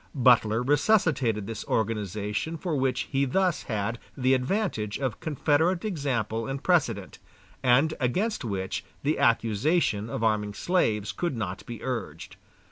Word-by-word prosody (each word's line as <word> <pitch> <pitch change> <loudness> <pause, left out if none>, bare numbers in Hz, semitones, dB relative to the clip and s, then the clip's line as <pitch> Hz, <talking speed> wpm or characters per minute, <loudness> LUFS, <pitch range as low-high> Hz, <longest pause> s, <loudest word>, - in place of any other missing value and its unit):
Butler 120 -3 +4
resuscitated 140 - +2
this 110 0 -5
organization 105 - -2
for 165 -1 -2
which 130 -2 +1
he 135 -1 +2
thus 180 +5 +1
had 110 +1 -2 0.2
the 130 0 +3
advantage 130 - -1
of 130 -5 -3
Confederate 160 +4 +1
example 125 - -1
and 135 0 -4
precedent, 120 - +1 0.4
and 135 +5 +4
against 185 - 0
which 95 -5 -3 0.2
the 150 +2 +1
accusation 115 - +2
of 115 - -3
arming 105 -2 +1
slaves 110 - +1
could 170 -8 -2
not 95 -4 -4
be 120 -3 -7
urged. 115 - -5
125 Hz, 130 wpm, -27 LUFS, 110-150 Hz, 0.4 s, Butler